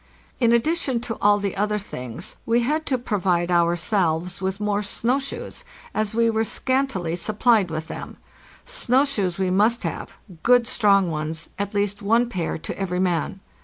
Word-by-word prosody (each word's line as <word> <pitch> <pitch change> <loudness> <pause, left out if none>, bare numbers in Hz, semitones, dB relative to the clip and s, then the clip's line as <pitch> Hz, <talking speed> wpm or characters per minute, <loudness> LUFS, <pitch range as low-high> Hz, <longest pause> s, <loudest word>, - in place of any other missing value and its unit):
In 235 -3 +4
addition 260 +1 +1
to 230 -2 -4
all 205 0 +5
the 200 -2 -3
other 210 +2 0
things 125 - -7
we 235 +1 +2
had 305 +6 -1
to 260 - +1
provide 180 -7 0
ourselves 175 0 +1
with 190 +1 -2
more 210 -1 0
snow 230 +6 0
shoes, 275 - -6 0.3
as 215 0 -1
we 230 0 +3
were 220 -1 +1
scantily 225 -8 0
supplied 215 +1 +2
with 155 0 -4
them. - - -7 0.5
Snow 270 - +2
shoes 200 -11 -1
we 190 -1 0
mst 215 +5 +3
have, - - -5 0.2
good 245 -1 +5
strong 200 -6 +3
ones, 155 +1 -4
at 200 +1 -3
least 205 0 0
one 230 +4 +2
pair 175 -7 -2
to 160 - -7
every 180 -2 -1
man. 180 +1 -1
205 Hz, 165 wpm, -23 LUFS, 180-235 Hz, 0.5 s, all